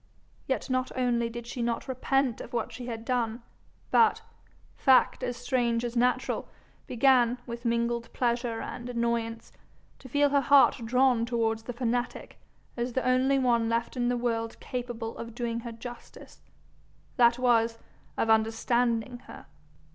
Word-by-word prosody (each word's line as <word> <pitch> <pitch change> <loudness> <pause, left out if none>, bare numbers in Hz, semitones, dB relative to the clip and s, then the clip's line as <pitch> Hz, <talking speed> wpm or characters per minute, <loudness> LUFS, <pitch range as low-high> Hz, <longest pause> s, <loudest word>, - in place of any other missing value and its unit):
Yet - - -1
not 255 -1 -1
only 240 -2 +1
did 235 0 -7
she 240 +1 -5
not 235 0 -2
repent 260 -1 0
of - - -10
what 235 -2 -2
she 250 -1 -7
had 225 -1 -6
done, 235 -2 -1 0.5
but, 455 - +4 0.5
fact 265 -2 +4
as 245 -1 -3
strange 245 -2 0
as 240 0 -4
natural, 245 +1 0 0.4
began, 250 -1 +3
with 235 0 -7
mingled 235 0 -1
pleasure 235 -2 -1
and 245 0 -6
annoyance, 235 -1 -2 0.5
to 260 - -12
feel 285 +3 +3
her 280 0 +3
heart 275 -3 +5
drawn 250 0 +3
towards 225 -2 0
the 245 +2 -6
fanatic 245 0 -3 0.4
as 240 0 -3
the 260 - -1
only 260 +2 +3
one 235 -3 +2
left 230 0 -1
her 250 - -3
in 240 - +1
the 245 - 0
world 230 -1 -2
capable 240 -2 -5
of 230 0 -7
doing 235 -1 -2
her 235 0 -7
justice, 240 +1 -11 0.8
that 235 -1 +5
was, 230 -2 +2 0.4
of - - +1
understanding 230 +2 +1
her. - - -11
240 Hz, 155 wpm, -28 LUFS, 230-250 Hz, 0.8 s, heart